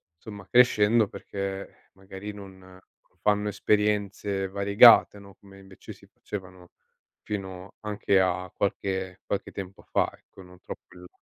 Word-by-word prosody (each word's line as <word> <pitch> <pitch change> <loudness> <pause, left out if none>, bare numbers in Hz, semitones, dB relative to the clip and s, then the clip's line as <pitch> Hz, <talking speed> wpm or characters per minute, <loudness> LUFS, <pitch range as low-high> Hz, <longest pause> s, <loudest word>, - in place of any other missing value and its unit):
insomma 100 +2 -11
crescendo 115 -3 +4
perché 100 0 -5
eh, - - -30
magari 95 +1 -9
non 100 -2 -11
non 95 0 -20
fanno 105 0 +1
esperienze 100 -1 0
variegate, 100 +2 +6
no, 100 -1 -15
come 100 -1 -17
invece 95 -1 -12
si - - -20
facevano 90 -3 -9 0.5
fino 95 -2 -6
anche 105 -2 +1
a 90 0 -1
qualche 95 -2 -2
qualche 100 - -3
tempo 95 -1 -8
fa, - - 0
ecco, - - -17
non 90 0 -16
troppo - - -11
in - - -13
là. 90 - -17
100 Hz, 145 wpm, -26 LUFS, 95-105 Hz, 0.5 s, variegate